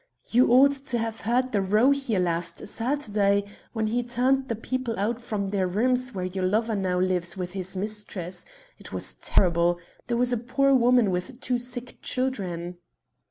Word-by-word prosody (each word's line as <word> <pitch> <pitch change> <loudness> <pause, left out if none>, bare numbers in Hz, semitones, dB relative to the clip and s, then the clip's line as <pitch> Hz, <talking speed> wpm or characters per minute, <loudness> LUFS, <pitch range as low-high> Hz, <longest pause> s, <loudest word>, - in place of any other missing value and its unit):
You 245 +1 +5
ought 270 +3 +7
to 275 -3 -2
have 225 -1 -3
heard 250 +4 +1
the 205 - +1
row 210 +8 +4
here 270 -8 0
last 170 0 -2
Saturday 210 -5 +1 0.3
when 220 -2 0
he 235 +3 0
turned 255 +2 +1
the 230 - -1
people 240 +1 -3
out 225 +4 -1
from 205 -4 -3
their 195 -2 0
rooms 250 +6 +1
where 185 -1 -2
your 185 +1 -3
lover 220 +4 +1
now 185 -2 0
lives 180 -1 0
with 180 -1 -4
his 190 0 -4
mistress. 200 -3 -5 0.4
It - - -10
was - - -5
terrible. 175 -1 +2 0.3
There 240 -1 0
was 245 0 +3
a - - +2
poor 275 +4 +2
woman 245 -4 +4
with 185 +8 -4
two 250 -3 0
sick 245 0 -7
children." 180 -9 -2
220 Hz, 175 wpm, -26 LUFS, 185-250 Hz, 0.4 s, ought